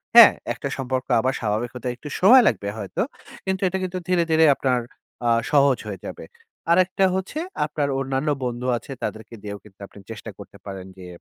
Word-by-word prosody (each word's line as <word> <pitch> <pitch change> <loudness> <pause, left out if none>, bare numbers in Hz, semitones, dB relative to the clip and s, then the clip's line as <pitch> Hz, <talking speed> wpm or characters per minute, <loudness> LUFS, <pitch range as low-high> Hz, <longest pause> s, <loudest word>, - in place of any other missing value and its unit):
হ্যাঁ, - - +11 0.2
একটা - - -5
সম্পর্ক 130 -1 -2
আবার 130 +3 +1
স্বাভাবিক 110 +2 -1
হতে 125 0 -5
একটু 150 +4 -9
সময় 240 +7 +8
লাগবে 100 -2 0
হয়তো। 100 -3 -3 0.4
কিন্তু 190 0 -1
এটা 190 - -1
কিন্তু 185 0 -3
ধীরে, 180 -2 +3
ধীরে 160 0 +5
আপনার 130 -2 +1 0.5
আ - - +4 0.2
সহজ 140 -3 +5
হয়ে 100 -2 -5
যাবে। - - -8 0.5
আরেকটা 185 +2 +3
হচ্ছে 190 +11 -3 0.3
আপনার 150 -1 -2
অন্যান্য 135 +2 -1 0.2
বন্ধু 120 +1 -3
আছে 120 - -11
তাদেরকে 110 +1 -5
দিয়েও 100 0 -5
কিন্তু 100 -2 -19
আপনি 100 - -15
চেষ্টা 110 0 -7
করতে 100 0 -12
পারেন। 95 -2 -7
যে 90 -1 -10
130 Hz, 180 wpm, -23 LUFS, 105-160 Hz, 0.5 s, হ্যাঁ